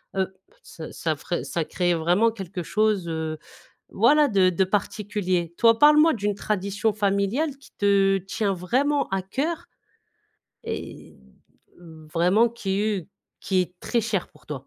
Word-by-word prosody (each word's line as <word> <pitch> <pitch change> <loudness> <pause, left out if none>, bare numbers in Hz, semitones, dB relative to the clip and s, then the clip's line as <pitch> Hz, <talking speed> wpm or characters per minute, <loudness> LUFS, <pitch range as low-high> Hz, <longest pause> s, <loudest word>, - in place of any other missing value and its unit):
heu, 190 0 -1 0.3
ça 160 - -10
ça 160 -2 -2
ferait 175 +4 -4
ça 170 - -2
crée 175 +1 0
vraiment 175 +8 +3
quelque 195 -4 -6
chose, 210 0 +1
heu, 160 -1 -3 0.5
voilà 290 +8 +4
de 190 -3 +4
de 185 +1 +1
particulier. 190 -3 -2
Toi, 230 -1 +4
parle-moi 300 +2 +6
d'une 205 -2 -1
tradition 205 +1 -1
familiale 210 +9 0
qui 280 - -19
te 195 -1 +3
tient 195 +2 -2
vraiment 270 +11 0
à 195 0 -1
coeur. 275 - -3 1.0
Et - - -7 0.6
heu, 160 -2 -14
vraiment 185 +8 +3
qui 195 -4 -2
est 205 -5 -2 0.3
qui 190 -1 +1
est 180 - -9
très 235 - 0
chère 205 -5 -2
pour - - -23
toi. 140 -3 -7
195 Hz, 145 wpm, -24 LUFS, 180-220 Hz, 1.0 s, parle-moi